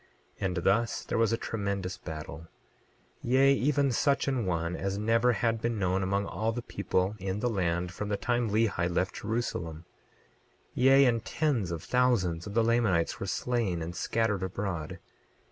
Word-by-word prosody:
28:2 - - -2
And 90 - -3
thus 115 +4 +2
there - - -2
was 115 -1 +3
a 115 - +1
tremendous 100 -5 -3
battle; 80 0 -7 0.7
yea, 135 +3 +4
even 140 0 +2
such 140 +4 +1
an 130 -7 0
one 85 0 -1
as 100 0 -2
never 115 +3 +3
had 115 -2 0
been 120 -1 -1
known 95 -1 +1
among 100 +1 0
all 110 +5 -1
the 120 +1 -5
people 95 -1 -1
in 95 +1 -3
the 125 - 0
land 90 -3 -1
from 105 +3 -5
the 100 - 0
time 120 +1 0
Lehi 105 -5 +1
left 90 +1 0
Jerusalem; 85 -8 -3 0.9
yea, 135 +2 +6
and 115 -3 +2
tens 130 - 0
of 85 -1 -4
thousands 105 -10 +1
of 100 - -7
the 115 - +4
Lamanites 110 -8 +1
were 100 - -4
slain 100 -5 -1
and 85 +2 -6
scattered 110 -3 0
abroad. 95 -4 -4
105 Hz, 170 wpm, -29 LUFS, 90-120 Hz, 0.9 s, yea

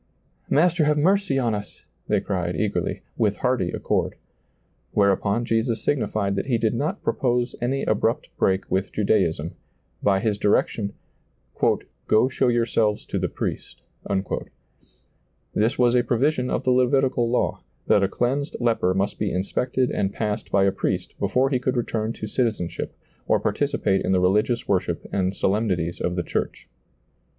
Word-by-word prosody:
" - - -39
Master, 170 -1 +3
have 150 0 +2
mer<y 190 -1 +2
on 120 -4 +1
us," 105 -1 -7 0.2
they - - +2
cried 90 -3 -2
eager 105 -2 0
ly, - - -4 0.2
with - - +2
hearty - - 0
accord. - - -1 0.8
Whereupon 100 +3 +2
Jesus 115 0 0
signi 145 -5 +1
fied 100 -2 -1
that 100 - -2
He 125 -4 +2
did 110 -1 +1
not 155 - -2
propose 125 -2 0
any 135 +3 0
abrupt - - 0
break 95 0 +1
with 95 +1 0
Judaism, 85 -6 +1 0.5
by 95 -1 +3
His 105 0 -1
direction, 100 0 +1 0.6
" - - -1
Go 110 +4 +4
show 130 0 +1
your 120 -1 +2
selves 110 -2 0
to - - -2
the - - -1
priest" - - -5 1.7
This 110 +3 +1
was 120 -1 +4
a 125 -1 +4
provision 125 +2 +1
of - - -1
the 130 - +2
Levitical 125 -1 +2
law, 125 - 0 0.2
that 100 - +4
a 95 - +3
cleansed 135 +8 -1
leper 115 -6 +1
must 100 +1 -1
be 105 - 0
in 90 - 0
spected 125 +4 0
and 95 -1 0
passed 105 0 -3
by 100 -1 +4
a 100 - +4
priest - - -2
before 135 +2 +1
he 130 - +2
could 125 +1 -1
return 115 -2 -1
to 110 - -6
citizenship 110 -5 -2 0.3
or - - +3
participate 95 0 0
in - - +1
the 95 - +4
religious 105 +6 +2
worship 95 -2 0
and 95 0 0
solemnities 95 -5 0
of 90 - -1
the 90 - -1
church. - - -3
110 Hz, 165 wpm, -24 LUFS, 100-125 Hz, 1.7 s, Go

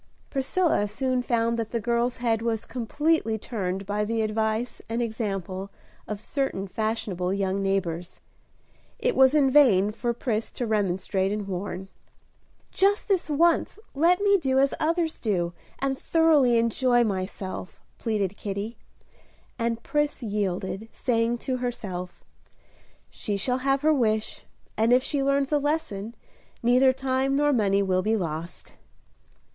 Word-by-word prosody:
Priscilla 275 - +1
soon 255 +4 -1
found 235 -1 0
that 225 -1 -2
the 235 - -1
girl's 235 +2 0
head 230 -2 0
was 230 -1 -1
completely 255 0 0
turned 195 -4 -3
by 205 +2 -1
the 225 +1 0
advice 220 +2 -1
and 230 +1 -1
example 195 -5 -3 0.4
of 210 -1 -4
certain 220 -5 -2
fashionable 200 -4 -2
young 195 0 0
neighbors. 180 -3 -2 0.8
It - - 0
was 265 +2 +6
in 275 -3 +4
vain 215 -9 +5
for 240 +2 -2
Pris 230 -2 -2
to 245 - -3
remonstrate 195 -2 0
and 210 -1 -3
warn. 190 0 -4 0.8
"Just 400 +2 +2
this 380 -6 +1
once 330 +6 +2 0.2
let 340 +6 +3
me 400 -1 +4
do 265 -4 +1
as 275 +1 +3
others 330 0 0
do, 175 -6 0 0.2
and 270 -1 -1
thoroughly 305 -7 +4
enjoy 240 +1 +3
myself." 190 -2 -4 0.2
pleaded 205 -4 -1
Kitty; 205 +3 -5 0.8
and 230 0 -1
Pris 295 -3 -1
yielded, 200 0 -2
saying 235 -1 0
to 260 -1 0
herself, 195 -8 -5 0.9
"She 205 -1 -3
shall 250 +6 0
have 270 +1 +1
her 310 +1 +4
wish, 220 -5 0 0.3
and 225 +2 +2
if 255 +1 +4
she 285 0 -1
learns 275 0 +1
a 295 - +3
lesson, 245 -8 -2 0.5
neither 250 +2 +5
time 265 +1 0
nor 290 +1 +3
money 200 -4 +2
will 185 -1 +1
be 220 +3 +1
lost." 165 -2 -5
230 Hz, 140 wpm, -26 LUFS, 200-270 Hz, 0.9 s, was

